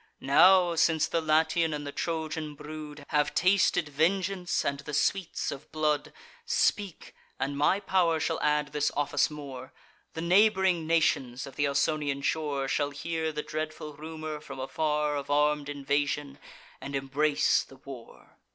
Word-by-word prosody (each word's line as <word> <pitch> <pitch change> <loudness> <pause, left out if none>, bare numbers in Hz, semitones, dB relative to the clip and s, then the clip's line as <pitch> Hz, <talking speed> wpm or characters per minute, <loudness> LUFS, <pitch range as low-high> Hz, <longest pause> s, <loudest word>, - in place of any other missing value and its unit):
Now, 175 +5 +5
since 160 -1 +3
the 165 - -1
Latian 160 +1 +2
and 145 0 -6
the 145 - -5
Trojan 160 -1 -3
brood 150 -1 -9
Have 150 -1 +1
tasted 185 -2 +3
vengeance 180 +4 0
and 140 0 -1
the 150 0 -5
sweets 190 +3 0
of 140 0 -9
blood; 150 -2 0 0.3
Speak, 205 - -1 0.3
and 140 +1 -2
my 150 +7 +2
pow'r 175 -5 +2
shall - - -1
add 150 0 +1
this 150 0 +1
office 145 0 +1
more: 135 -4 -9 0.4
The 160 - -3
neighbr'ing 190 -2 +3
nations 135 -6 +1
of 135 - -11
th' 145 - +1
Ausonian 140 0 0
shore 145 -3 -1
Shall 145 +1 0
hear 160 +3 -3
the 150 0 -4
dreadful 155 -1 -5
rumour, 155 0 -6
from 140 - -9
afar, 150 +2 -1
Of 140 -1 -5
arm'd 150 0 +2
invasion, 145 0 -2 0.4
and 140 +1 -5
embrace 140 +2 +2
the 135 - -16
war." 130 -3 -12
150 Hz, 150 wpm, -28 LUFS, 145-160 Hz, 0.4 s, Now